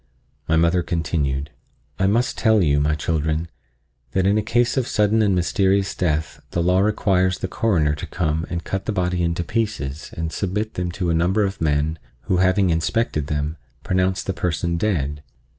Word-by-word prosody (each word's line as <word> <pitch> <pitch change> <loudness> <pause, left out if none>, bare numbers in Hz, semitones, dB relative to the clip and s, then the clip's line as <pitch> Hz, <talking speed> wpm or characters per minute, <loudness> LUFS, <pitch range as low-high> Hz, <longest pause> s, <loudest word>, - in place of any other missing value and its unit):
My 80 - +2
mother 85 +2 +3
continued: 75 -5 -1 0.5
"I 95 - +3
must 115 +5 +1
tell 110 -3 +3
you, 70 -2 +3
my 75 +1 +1
children, 80 +1 -1 0.6
that 95 -1 +2
in 100 +1 +3
a 110 - +2
case 120 +3 +1
of 130 -3 0
sudden 105 +1 +2
and 100 -3 +3
mysterious 95 +2 +1
death 80 -3 -1
the 85 - -1
law 90 +2 +3
requires 95 -3 +2
the - - -3
Coroner 90 -7 +1
to 75 - -6
come 80 -1 -1
and 85 -1 -3
cut 95 0 -4
the - - +1
body 90 -2 0
into 85 0 0
pieces 85 - -3
and 80 0 -3
submit 105 +3 -2
them 90 -1 -2
to 85 -1 -1
a - - +2
number 90 +6 +2
of 95 -2 -3
men 75 +1 +1 0.2
who, 90 - 0
having 95 0 +3
inspected 80 -1 0
them, 75 +2 -2 0.3
pronounce 95 +1 0
the 95 - -2
person 85 -1 -1
dead. 75 -7 -1
90 Hz, 180 wpm, -22 LUFS, 80-100 Hz, 0.6 s, mother